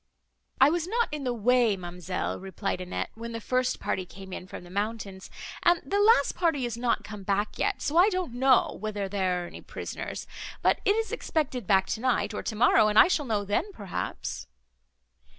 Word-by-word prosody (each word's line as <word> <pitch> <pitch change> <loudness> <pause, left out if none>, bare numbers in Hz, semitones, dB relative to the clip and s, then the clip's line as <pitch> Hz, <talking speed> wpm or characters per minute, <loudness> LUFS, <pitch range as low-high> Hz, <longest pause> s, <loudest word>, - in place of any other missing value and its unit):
"I 270 +3 +7
was 345 0 -1
not 470 +4 +1
in 300 -2 -4
the 250 - +1
way, 240 -2 +3
ma'amselle," 180 0 -4
replied 190 0 -3
Annette, 180 0 -4
"when 230 +1 -7
the 230 - -3
first 255 +2 0
party 185 - -2
came 190 +1 -11
in 185 - -7
from 185 - -8
the 175 - -13
mountains, 200 -1 -4 0.3
and 345 0 +4
the 400 - 0
last 410 -9 +5
party 325 -7 +1
is 240 -2 -3
not 235 0 0
come 210 -1 -8
back 200 +2 -1
yet, 410 -1 0
so 300 +3 0
I 370 +4 +7
don't 365 - -2
know, 260 +1 +3
whether 210 -2 -3
there 185 -2 0
are - - -6
any - - -10
prisoners; - - -6 0.4
but - - +3
it 405 - +4
is 450 0 -1
expected 260 - -2
back 190 -1 +4
tonight, 220 -3 0
or - - -3
tomorrow, 220 -1 +4
and 210 0 +1
I - - +9
shall 300 -5 +1
know 210 -3 0
then, 205 - -1
perhaps." 200 - -5
225 Hz, 195 wpm, -28 LUFS, 195-285 Hz, 0.4 s, I